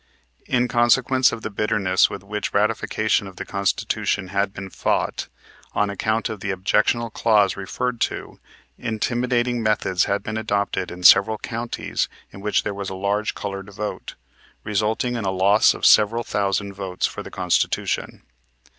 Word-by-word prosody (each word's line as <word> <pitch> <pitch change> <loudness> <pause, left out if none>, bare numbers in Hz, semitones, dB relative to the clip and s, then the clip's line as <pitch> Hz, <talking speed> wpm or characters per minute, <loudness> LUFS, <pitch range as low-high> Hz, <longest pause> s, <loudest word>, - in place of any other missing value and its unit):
In 125 -1 +2
consequence 130 +2 +3
of 115 - -6
the - - -4
bitterness 100 -3 +2
with 100 -1 -7
which 105 +1 -3
the - - 0
ratification 110 -1 +1
of 95 - -11
the - - -6
Constitution 100 -1 -1
had 100 0 0
been 95 -1 -8
fought, - - -1 0.5
on 105 0 +1
account 110 +3 -1
of 110 - -6
the 100 - -4
objectionable 105 +5 +1
clause 105 -4 +3
referred 120 +5 -3
to, - - -3 0.4
intimidating 120 +2 0
methods 105 -4 +1
had 100 0 -1
been 110 0 -4
adopted 100 -3 -1
in 90 +1 -9
several 110 +4 +7
counties 115 +2 -3 0.2
in 100 - -10
which 105 +1 +1
there 105 - -3
was 100 -1 -5
a 95 - -5
large 100 +3 -1
colored 100 -1 -5
vote, 105 +1 -6 0.5
resulting 110 +4 0
in 115 - -3
a 95 - 0
loss 95 +3 +4
of - - -3
several 115 +2 +5
thousand 100 -1 -1
votes 95 -2 -3
for - - -4
the - - -9
Constitution. - - -1
105 Hz, 160 wpm, -22 LUFS, 100-115 Hz, 0.5 s, several